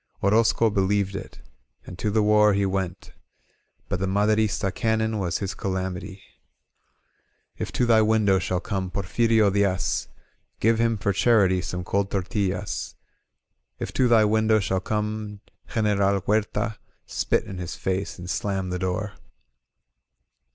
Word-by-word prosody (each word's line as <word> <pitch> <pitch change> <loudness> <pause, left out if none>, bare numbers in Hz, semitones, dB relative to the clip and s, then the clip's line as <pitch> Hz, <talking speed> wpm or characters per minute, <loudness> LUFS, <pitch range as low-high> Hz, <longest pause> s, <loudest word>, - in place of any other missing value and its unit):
Orozco 110 +2 +3
believed 100 0 +1
it - - -8 0.4
And 90 - -10
to 105 - 0
the 110 +1 +2
war 105 0 +5
he 100 0 +1
went; 95 -2 -3 0.7
But - - -2
the 95 - -1
Maderista 105 0 +1
cannon 110 -1 0
Was 90 -3 -1
his 95 -2 -3
calamity. 95 0 -4 1.4
If - - -3
to 125 - +1
thy 115 -2 +5
window 105 -3 +3
shall 90 0 -2
come 95 -4 -3
Porfirio 105 +3 +2
Diaz^ 100 -2 0 0.5
Give 115 +1 +2
him 115 -1 +2
for 100 0 0
charity 100 -4 +3
some 90 0 -4
cold 100 +2 -1
tortillas; 95 -1 -2 0.8
If - - -5
to 130 - +3
thy 115 -2 +5
window 110 +1 +3
shall 95 -1 0
come 105 0 -3 0.3
General 100 -3 +2
Huertay 105 +2 -1 0.3
Spit - - 0
in 95 -2 -8
his 90 -1 -5
face 95 +2 -3
and 90 0 -8
slam 95 0 -2
the 90 - -2
door. 95 +3 -2
100 Hz, 135 wpm, -25 LUFS, 95-110 Hz, 1.4 s, war